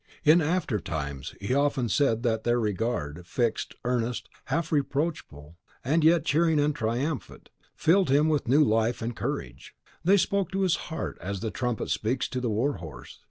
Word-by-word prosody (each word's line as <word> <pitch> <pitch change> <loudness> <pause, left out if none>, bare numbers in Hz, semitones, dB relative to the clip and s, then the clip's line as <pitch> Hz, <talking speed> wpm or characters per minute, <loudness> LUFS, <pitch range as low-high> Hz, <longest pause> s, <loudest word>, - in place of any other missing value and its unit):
In 160 +3 +6
aftertimes 85 - -2
he 100 +6 -2
often 140 -3 +1
said 115 -2 +1
that 110 -2 0
their 120 0 +2
regard, 95 -7 -2
fixed, 120 +2 -1
earnest, 120 -1 -1 0.2
half 165 +4 -1
reproachful, 140 - -2 0.3
and 155 +5 +2
yet 165 -1 +4
cheering 160 0 +3
and 150 +1 +2
triumphant, 125 +6 -3 0.2
filled 180 0 +3
him 145 +3 +4
with 150 -5 0
new 145 +5 +5
life 115 -1 +1
and 115 +1 -3
courage. 65 0 -5 0.3
They 195 +4 +5
spoke 195 -1 0
to 195 - 0
his 185 -3 +3
heart 160 - -4
as 100 0 -4
the 110 -1 -2
trumpet 125 -3 -2
speaks 125 +4 0
to 130 - -3
the 120 - -1
war 120 +7 0
horse. 80 -3 -10
125 Hz, 165 wpm, -27 LUFS, 110-155 Hz, 0.3 s, In